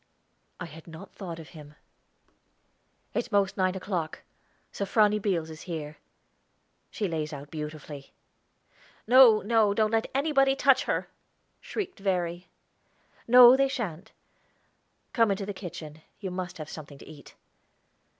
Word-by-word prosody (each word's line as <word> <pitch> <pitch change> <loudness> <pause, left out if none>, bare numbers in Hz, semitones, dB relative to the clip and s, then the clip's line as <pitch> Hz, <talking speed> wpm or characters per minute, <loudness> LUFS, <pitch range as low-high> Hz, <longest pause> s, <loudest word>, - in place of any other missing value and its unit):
I - - -5
had 160 +3 -13
not 160 0 -11
thought 175 -5 -7
of 165 -2 -11
him. 150 -2 -13 1.4
"It's 240 0 -3
most 200 -1 +2
nine 185 0 0
o'clock. 180 -4 -4 0.5
Sofrony 210 +1 +2
Beals 170 -6 -1
is 155 - -10
here; 155 -2 -6 0.9
she 205 - -3
lays 155 -3 -3
out 145 -1 -9
beautifully." 150 -2 -8 0.9
"No, 240 -2 +7
no; 215 -1 +2
don't 215 0 +2
let 225 0 0
anybody 275 -1 +3
touch 275 -1 +3
her!" - - -1 0.5
shrieked 385 - -6
Verry. 180 -2 -2 0.8
"No, 245 +1 +9
they 275 +1 +3
shan't. 220 - -5 1.0
Come 230 -3 +3
into 195 0 -1
the 205 - -5
kitchen; 160 -5 -9 0.2
you 190 -3 -5
must 180 0 -5
have 155 -2 -7
something 145 -2 -10
to - - -14
eat." 150 -2 -14
190 Hz, 130 wpm, -27 LUFS, 160-225 Hz, 1.4 s, No